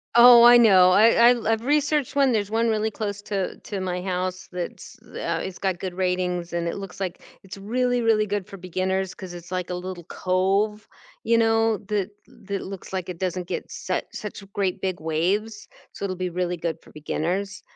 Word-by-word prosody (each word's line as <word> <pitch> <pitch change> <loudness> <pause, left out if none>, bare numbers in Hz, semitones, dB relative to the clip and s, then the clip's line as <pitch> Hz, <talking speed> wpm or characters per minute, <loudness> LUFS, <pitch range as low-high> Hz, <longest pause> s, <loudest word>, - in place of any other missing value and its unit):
Oh, 240 0 +9
I 240 0 +9
know. 190 -6 +7
I 230 +4 +6
I 230 -2 0
I've 225 +1 0
researched 295 0 +1
1. 275 -2 +4
There's 210 -3 0
1 230 +1 +1
really 220 0 +1
close 205 -1 -4
to 195 -3 -3
to 200 -2 -6
my 180 -1 -3
house 185 0 -3
that's 180 -1 -7
uh, - - -4
it's 190 -1 -7
got 190 -3 -1
good 185 -2 -4
ratings, 180 -1 -1
and 170 0 -2
it - - -3
looks 195 -1 -8
like 185 -3 -4 0.2
it's 195 +1 -10
really, 245 +4 0
really 220 -2 +3
good 205 -2 -3
for 195 - -10
beginners 185 +1 -2
'cause 185 -2 -9
it's, 175 +1 -11
like, 180 -1 -3
a 180 - -2
little 180 -1 -6
cove, 195 +3 0 0.4
you 230 0 +3
know, 225 -1 +3
that 205 -1 0 0.2
that 205 -6 -6
looks, 195 -1 -8
like, 185 -2 -3
it 180 -2 -7
doesn't 180 -1 -2
get - - -4
su - - -2
such 210 -1 -7
great 195 -3 -1
big 185 -3 -2
waves, 190 +7 -1 0.3
so 200 - -5
it'll 185 -1 -3
be 185 -1 -2
really 180 0 -2
good 165 -1 -3
for - - -18
beginners. 180 +6 -3
195 Hz, 200 wpm, -24 LUFS, 180-220 Hz, 0.4 s, Oh